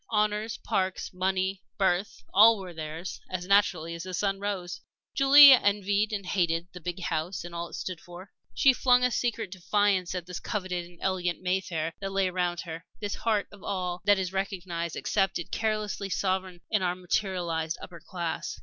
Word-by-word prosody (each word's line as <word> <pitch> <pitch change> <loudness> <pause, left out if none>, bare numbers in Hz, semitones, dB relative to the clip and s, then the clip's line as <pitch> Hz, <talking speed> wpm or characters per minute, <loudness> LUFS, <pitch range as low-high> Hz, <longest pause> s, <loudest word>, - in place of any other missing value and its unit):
Honors, 210 0 0
parks, 190 -1 -2
money, 190 +1 -1 0.2
birth 190 +1 0
all 220 +3 +8
were 185 -3 -8
theirs, 160 +2 -6
as 180 -1 -4
naturally 185 -4 +2
as 170 - -6
the 185 +1 -5
sun 195 +1 0
rose. 195 -3 -4 0.3
Julie 280 +1 +9
envied 205 -2 +3
and 200 -2 -3
hated 170 -2 0
the 180 - -9
big 175 +3 -5
house 165 +2 -2
and 175 0 -9
all 170 0 -4
it - - -8
stood 185 -3 -5
for; 175 +2 -12 0.2
she 270 - +5
flung 250 0 +4
a 250 - +3
secret 230 -5 -1
defiance 190 -1 +1
at 180 -2 -4
this 180 -1 -6
coveted 185 -4 -3
and 175 0 -17
elegant 180 -2 -1
Mayfair 180 -3 -1
that 195 0 -3
lay 195 -1 +1
around 180 -1 -1
her, 165 -1 -7 0.2
this 205 -1 -3
heart 215 -3 0
of 205 -1 -14
all 180 -2 -3
that 205 -1 +5
is 190 -1 -2
recognized, 180 -4 -3
accepted, 195 -4 -1
carelessly 215 -2 -2
sovereign 185 -2 -1
in 215 - +2
our 180 -1 0
"materialized" 175 -3 -1
upper 170 -2 -10
class. 170 -4 -4
185 Hz, 175 wpm, -28 LUFS, 175-205 Hz, 0.3 s, Julie